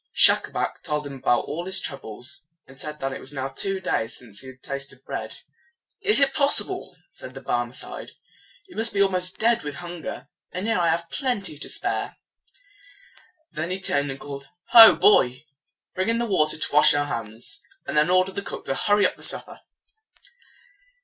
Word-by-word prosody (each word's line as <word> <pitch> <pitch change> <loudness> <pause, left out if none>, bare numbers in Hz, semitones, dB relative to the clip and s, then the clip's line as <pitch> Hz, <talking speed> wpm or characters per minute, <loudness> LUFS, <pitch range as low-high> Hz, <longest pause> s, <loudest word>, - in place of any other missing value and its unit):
Schacabac - - +3
told 150 0 -2
him 140 - -7
about 130 -2 +1
all 170 +3 -5
his 190 - +2
troubles, 130 +1 -7 0.2
and 135 0 -11
said 150 0 -6
that 135 0 -3
it - - -6
was 130 - -11
now 135 -1 -4
two 195 +8 -3
days 115 -11 -1
since 110 -5 -9
he 130 - -10
had 130 0 -13
tasted 140 -1 -6
bread. - - -5 0.6
"Is 420 -3 +7
it 275 -1 +4
possible?" 290 - +1
said 130 - -10
the - - -6
Barmecide. 120 -1 -4 0.6
"You 360 - -15
must 225 +1 +1
be 200 - +3
almost 185 -1 -1
dead 230 +1 +2
with 145 -1 -5
hunger; 175 -4 -7 0.2
and 185 +2 -4
here 225 -4 +1
I 170 -1 +2
have 170 +1 -1
plenty 245 - -2
and 145 - -15
to - - -4
spare!" - - -2 1.3
Then 160 +2 -4
he 185 +1 -3
turned 145 -6 -1
and 135 0 -6
called, 140 -1 -8 0.2
"Ho, 225 -2 +10
boy! 130 -8 +4 0.5
Bring 185 +4 -1
in 230 - +1
the 235 - 0
water 155 -9 +1
to 155 - -2
wash 150 +1 +8
our 145 0 +1
hands, 115 - -6 0.2
and - - -4
then 150 +2 +4
order 185 +1 +3
the 200 - -4
cook - - -6
to - - -1
hurry 205 +7 +3
the - - -18
supper." - - -3
155 Hz, 185 wpm, -24 LUFS, 135-195 Hz, 1.3 s, Ho